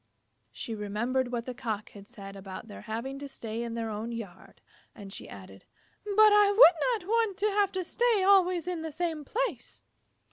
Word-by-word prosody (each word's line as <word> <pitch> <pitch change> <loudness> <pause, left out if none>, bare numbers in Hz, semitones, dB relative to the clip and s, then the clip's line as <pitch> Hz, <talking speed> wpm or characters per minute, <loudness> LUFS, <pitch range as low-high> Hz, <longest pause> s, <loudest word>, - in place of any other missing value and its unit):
She 230 - -6
remembered 235 +5 -1
what 240 -1 -3
the 255 - -5
Cock 220 -4 -4
had 200 -1 -13
said 200 -4 -10
about 195 +2 -9
their 205 - -10
having 235 +5 -5
to 285 - -6
stay 230 -4 -6
in 235 -1 -4
their 225 -1 -3
own 215 +3 -4
yard, 225 -6 -9 0.4
and 195 -1 -10
she - - -9
added, 95 0 -12 0.4
"But 425 +1 +5
I 415 -1 +6
would 410 +1 +5
not - - -14
want 445 -3 +1
to 420 +1 +1
have 400 -1 +2
to 375 -1 -2
stay 460 +2 +1
always 370 -3 +4
in 355 -3 -3
the 320 0 -5
same 320 -1 -3
place." - - -4
270 Hz, 190 wpm, -29 LUFS, -, 0.4 s, I